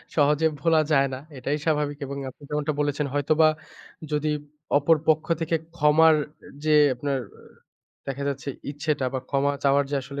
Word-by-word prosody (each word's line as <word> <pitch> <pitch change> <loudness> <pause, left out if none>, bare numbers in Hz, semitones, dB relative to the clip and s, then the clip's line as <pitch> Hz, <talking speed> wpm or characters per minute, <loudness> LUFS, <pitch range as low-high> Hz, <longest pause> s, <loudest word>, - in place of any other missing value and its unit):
সহজে 150 +1 +3
ভোলা 165 0 +4
যায় 140 -2 +4
না 130 - -5 0.2
এটাই 140 +3 -2
স্বাভাবিক। 150 -2 0
এবং 140 +1 -6
আপনি 140 - -17
যেমনটা 150 +1 -1
বলেছেন 145 0 0
হয়তোবা 150 +2 +3 0.6
যদি 150 +1 0 0.5
অপর 150 +3 +4
পক্ষ 155 -1 +3 0.2
থেকে 165 +1 0 0.2
ক্ষমার 155 +1 +5 0.5
যে 155 -1 +4 0.2
আপনার, 140 +2 -2 0.9
দেখা 135 +1 -4
যাচ্ছে 140 0 -4 0.2
ইচ্ছেটা 145 -1 -1
বা - - 0
ক্ষমা 140 0 +1
চাওয়ার 140 +1 +4
যে - - -1
আসলে 140 +2 -7
145 Hz, 155 wpm, -25 LUFS, 140-155 Hz, 0.9 s, ক্ষমার